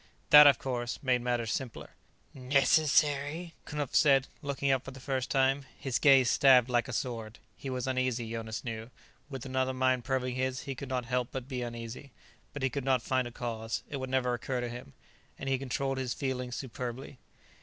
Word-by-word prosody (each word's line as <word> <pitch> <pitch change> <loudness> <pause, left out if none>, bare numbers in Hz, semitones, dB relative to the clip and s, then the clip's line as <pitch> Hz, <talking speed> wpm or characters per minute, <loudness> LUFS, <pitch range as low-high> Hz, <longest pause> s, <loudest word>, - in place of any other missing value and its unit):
That, 150 0 +11
of 140 - +6
course, 120 -2 -3
made 125 -2 +2
matters 120 -3 -1
simpler. 130 -4 -5 0.4
"Necessary?" 145 +4 +2
Knupf 150 -3 -4
said, 135 -3 +5
looking 140 -1 -1
up 135 -1 +1
for - - -8
the 130 0 -10
first 130 0 -2
time. 135 +1 +2
His 135 -3 -2
gaze 135 -4 +6
stabbed 125 -1 +5
like 120 +1 +2
a - - -6
sword. 115 -2 -4 0.2
He 135 - -7
was 125 -1 -3
uneasy, 130 -3 -1
Jonas 115 -1 -5
knew; 115 -1 -5 0.4
with 135 -3 -7
another 130 0 -1
mind 130 -1 +1
probing 130 0 -1
his, 130 0 -2
he 135 - -5
could 135 +1 -8
not 125 -2 -2
help 125 0 -1
but 130 -1 -5
be 130 -2 -4
uneasy. 120 +3 -7 0.4
But 145 - -6
he 130 - +2
could 140 - -3
not 130 -2 +1
find 130 -1 0
a - - -8
cause; 115 -2 -4
it 140 - -3
would 130 -1 -5
never 130 -1 +1
occur 125 +1 -3
to 120 0 -3
him. 120 - -9 0.4
And 135 - -7
he 135 -1 +1
controlled 135 0 -2
his 125 -2 -2
feelings 125 -3 -3
superbly. 125 +1 -6
130 Hz, 195 wpm, -30 LUFS, 120-135 Hz, 0.4 s, That